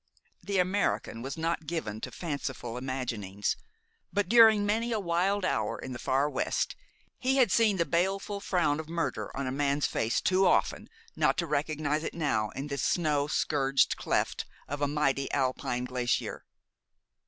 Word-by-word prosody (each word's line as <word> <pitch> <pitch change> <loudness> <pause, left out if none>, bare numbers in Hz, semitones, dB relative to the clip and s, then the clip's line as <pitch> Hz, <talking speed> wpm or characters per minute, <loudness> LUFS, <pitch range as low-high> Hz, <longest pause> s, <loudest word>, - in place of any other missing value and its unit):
The 200 -1 -2
American 185 - 0
was 135 +4 -5
not 160 -1 -2
given 110 -10 -3
to - - -4
fanciful 140 -7 -4
imaginings; 120 -6 -2 0.6
but 205 -1 0
during 220 -1 +7
many 225 +3 0
a 220 - +1
wild 185 +2 +1
hour 110 -11 0
in 130 - -7
the 120 - -6
Far 135 +4 +1
West 140 -3 -1 0.4
he 260 +1 +1
had 255 -3 +4
seen 220 -4 +4
the 170 - +2
baleful 195 +4 0
frown 170 -7 +1
of 160 0 -7
murder 170 0 -2
on 140 - -2
a 130 - -2
man's 140 +1 +1
face 115 +2 0
too 190 +1 +3
often - - +1 0.3
not - - +2
to 170 - 0
recognize 150 0 -1
it - - -4
now 110 -10 0
in 135 - -4
this 140 -1 -3
snow 150 -4 +1
scourged 140 -3 +2
cleft - - -1 0.2
of 145 +1 -5
a 145 - +2
mighty 140 -2 0
Alpine 130 -2 -1
glacier. 125 -1 -2
150 Hz, 165 wpm, -29 LUFS, 135-185 Hz, 0.6 s, during